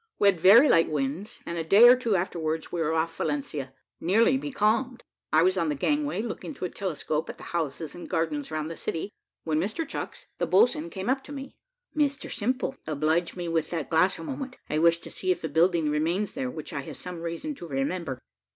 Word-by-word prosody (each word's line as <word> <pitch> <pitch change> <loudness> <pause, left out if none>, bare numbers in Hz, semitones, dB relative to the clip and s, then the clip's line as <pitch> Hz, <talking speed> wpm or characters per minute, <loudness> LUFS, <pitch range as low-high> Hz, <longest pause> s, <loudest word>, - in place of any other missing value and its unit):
We 200 - +5
had 185 -4 0
very 215 - +8
light 165 -10 +4
winds, 155 - -3
and 170 0 -3
a - - -1
day 200 +9 +8
or 250 - +9
two 235 -5 0
afterwards 160 -3 -2
we 170 - -2
were 155 0 +1
off 165 +1 0
Valencia, 145 -2 -2 0.3
nearly 225 +9 +3
becalmed. 255 -2 0 0.3
I 155 +1 +5
was 185 +1 +3
on 165 -3 +1
the 150 - 0
gangway, 290 - 0
looking 240 +5 -5
through 180 - -3
a - - -18
telescope 160 -4 -2
at - - -7
the - - -12
houses 160 -2 -2
and 175 - -9
gardens 160 -4 -1
round 155 0 -3
the - - -6
city, 165 +5 -3 0.3
when 155 -1 0
Mr 220 - -2
Chucks, - - -6
the - - 0
boatswain, 340 -7 +3
came 190 - -6
up 265 +1 +1
to - - -10
me. 275 -1 -7 0.4
"Mr 285 -2 0
Simple, 255 +4 -1
oblige 160 +3 0
me 175 -1 -4
with 165 -2 0
that 165 -3 -4
glass 180 +4 +3
a - - -8
moment; 270 -3 -5
I 155 - +1
wish 165 +1 +5
to - - -9
see 185 - -4
if 180 - +1
a - - 0
building 165 0 +2
remains 170 +7 0
there, 130 - -2
which 155 +4 -7
I 140 - -2
have - - -8
some 180 -2 -7
reason 170 - -4
to 175 -11 -9
remember." 140 0 -2
170 Hz, 220 wpm, -27 LUFS, 160-225 Hz, 0.4 s, or